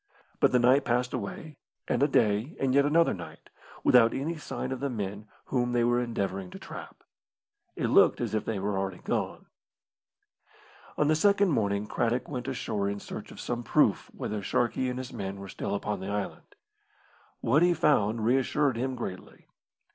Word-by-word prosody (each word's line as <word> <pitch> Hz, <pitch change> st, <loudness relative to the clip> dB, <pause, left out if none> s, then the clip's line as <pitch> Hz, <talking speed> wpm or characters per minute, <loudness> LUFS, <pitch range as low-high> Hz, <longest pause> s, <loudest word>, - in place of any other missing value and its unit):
But -, -, +4 dB
the 125 Hz, -, +4 dB
night 130 Hz, +3 st, +5 dB
passed 125 Hz, +1 st, 0 dB
away, 130 Hz, +7 st, -5 dB, 0.3 s
and -, -, 0 dB
a 145 Hz, -, +5 dB
day 110 Hz, +2 st, +1 dB
and 135 Hz, -1 st, +1 dB
yet 140 Hz, +1 st, +5 dB
another 165 Hz, +3 st, +4 dB
night, 90 Hz, -3 st, -10 dB, 0.3 s
without 115 Hz, -2 st, +5 dB
any 150 Hz, +6 st, -2 dB
sign 150 Hz, -4 st, -5 dB
of 130 Hz, -, -3 dB
the 140 Hz, +1 st, -1 dB
men 105 Hz, -2 st, -5 dB, 0.2 s
whom 125 Hz, -2 st, 0 dB
they 120 Hz, -1 st, +3 dB
were 120 Hz, +1 st, +3 dB
endeavouring 100 Hz, -5 st, -3 dB
to -, -, -9 dB
trap. -, -, -10 dB, 0.7 s
It -, -, -2 dB
looked -, -, +5 dB
as -, -, -2 dB
if 110 Hz, -, 0 dB
they 110 Hz, -, -2 dB
were 100 Hz, 0 st, -1 dB
already 95 Hz, -1 st, -3 dB
gone. -, -, -2 dB, 1.5 s
On 150 Hz, -, +2 dB
the 155 Hz, -, +4 dB
second 200 Hz, +4 st, +3 dB
morning 105 Hz, -7 st, 0 dB
Craddock 120 Hz, +3 st, -1 dB
went 125 Hz, -3 st, -5 dB
ashore 110 Hz, -6 st, -2 dB
in 100 Hz, 0 st, -3 dB
search -, -, -8 dB
of -, -, -11 dB
some 120 Hz, -1 st, -3 dB
proof -, -, +2 dB
whether 105 Hz, -1 st, -4 dB
Sharkey 120 Hz, +5 st, 0 dB
and 125 Hz, -, -4 dB
his 130 Hz, 0 st, -6 dB
men 100 Hz, -3 st, -5 dB
were 100 Hz, -, -8 dB
still 100 Hz, -, -3 dB
upon 105 Hz, +1 st, -3 dB
the 95 Hz, -, -5 dB
island. 100 Hz, -1 st, -5 dB, 0.9 s
What 140 Hz, +7 st, +3 dB
he 175 Hz, 0 st, +4 dB
found 115 Hz, -8 st, +2 dB
reassured 135 Hz, +2 st, +2 dB
him 130 Hz, +2 st, -2 dB
greatly. 95 Hz, -6 st, -8 dB
120 Hz, 180 wpm, -28 LUFS, 105-135 Hz, 1.5 s, night